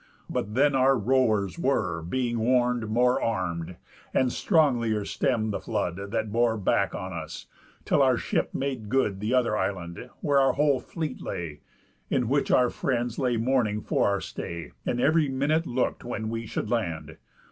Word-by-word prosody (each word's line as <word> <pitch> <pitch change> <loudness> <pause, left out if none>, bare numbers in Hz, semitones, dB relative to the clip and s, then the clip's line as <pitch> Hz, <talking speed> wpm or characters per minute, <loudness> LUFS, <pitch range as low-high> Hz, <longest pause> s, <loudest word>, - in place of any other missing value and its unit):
But 105 +3 -3
then 140 +2 +4
our 135 0 +4
rowers 110 - +1
were, 95 - 0
Being 120 +7 -1
warn'd, 120 -1 +2
more 125 +3 +3
arm'd, 90 -5 -2 0.4
and 130 -1 +3
stronglier 120 - +2
stemm'd 110 -4 0
the - - -2
flood 100 -2 -3
That 110 0 -2
bore 115 0 +2
back 100 - +1
on - - -5
us, - - -7 0.4
till - - +3
our - - +4
ship - - -1
made 130 -6 -3
good 110 -6 +1
The 110 +5 0
other 120 -4 +2
island, 95 +2 -3
where 145 -2 +3
our 135 0 +4
whole 145 -2 +2
fleet 155 -3 -5
lay, 80 -4 -5 0.5
In 125 -3 +1
which 140 +3 +1
our 125 -1 +4
friends 120 -3 -1
lay 125 -3 +1
mourning 115 -3 +1
for - - +1
our 100 -1 0
stay, 85 -1 -6 0.2
And 120 - 0
ev'ry 155 +2 +3
minute 145 +5 +1
look'd 125 +1 -1
when 110 -2 -4
we 115 0 -4
should 115 - -3
land. 90 -10 -2
120 Hz, 170 wpm, -27 LUFS, 105-130 Hz, 0.5 s, then